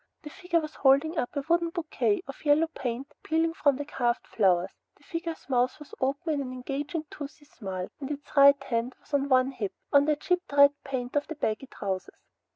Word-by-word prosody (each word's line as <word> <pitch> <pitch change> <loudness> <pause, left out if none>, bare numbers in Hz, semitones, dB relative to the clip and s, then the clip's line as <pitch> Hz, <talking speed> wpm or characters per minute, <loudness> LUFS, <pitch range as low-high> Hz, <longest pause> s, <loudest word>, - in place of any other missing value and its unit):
The 300 - -8
figure 355 -2 0
was 310 -1 -6
holding 290 +4 +3
up 245 - -1
a 285 - -1
wooden 340 0 +2
bouquet, 345 +3 -1
the 275 - -7
yellow 295 +2 +4
paint 250 +3 -4
peeling 325 +1 +1
from 285 -4 +3
the 290 +2 -4
carved 240 -4 -1
flowers. 185 -3 +2 0.3
The - - -26
figure's 330 -2 -5
mouth 255 -1 +1
was 300 - -14
open 280 +5 0
in 285 - -1
an 255 -2 -5
engaging 280 +5 -4
toothy 290 +1 -9
smile, 190 -9 -6
and 275 -1 -5
its 290 0 -7
right 280 0 +7
hand 240 -1 -2
was - - -24
on 280 0 +1
one 260 0 +4
hip, 215 -7 -4 0.2
on 285 0 +6
the 305 0 +3
chipped 360 +1 -1
red 285 0 +7
paint 255 -2 -4
of 290 - +1
the 320 - -6
baggy 245 -2 -2
trousers. 190 -6 -4
280 Hz, 205 wpm, -28 LUFS, 255-310 Hz, 0.3 s, right